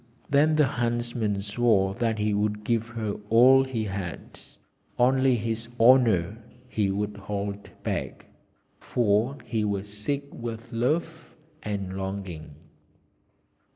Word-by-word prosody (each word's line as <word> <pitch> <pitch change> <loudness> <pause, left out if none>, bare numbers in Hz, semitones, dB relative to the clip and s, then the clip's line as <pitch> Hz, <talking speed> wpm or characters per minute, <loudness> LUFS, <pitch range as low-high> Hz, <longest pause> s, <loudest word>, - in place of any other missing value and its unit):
Then 150 +2 +4
the 150 -1 +5
huntsman 120 -5 -1
swore 100 -2 +2
that 115 0 -1
he 105 0 0
would 105 +1 -1
give 115 +1 0
her 110 -3 -4
all 130 +4 +7
he 130 -4 -3
had; 95 -4 -6 0.6
only 130 +1 +4
his 115 0 -3
honour 115 -5 +4 0.4
would 105 0 0
he - - -11
hold 100 0 -4
back, - - -3 0.5
for 120 +3 +1
he 115 -2 -1
was 100 -1 -2
sick 105 +8 -3
with 115 -1 -7
love 160 +7 -2 0.3
and 100 -4 -4
longing. 95 -6 -6
110 Hz, 120 wpm, -26 LUFS, 100-120 Hz, 0.6 s, all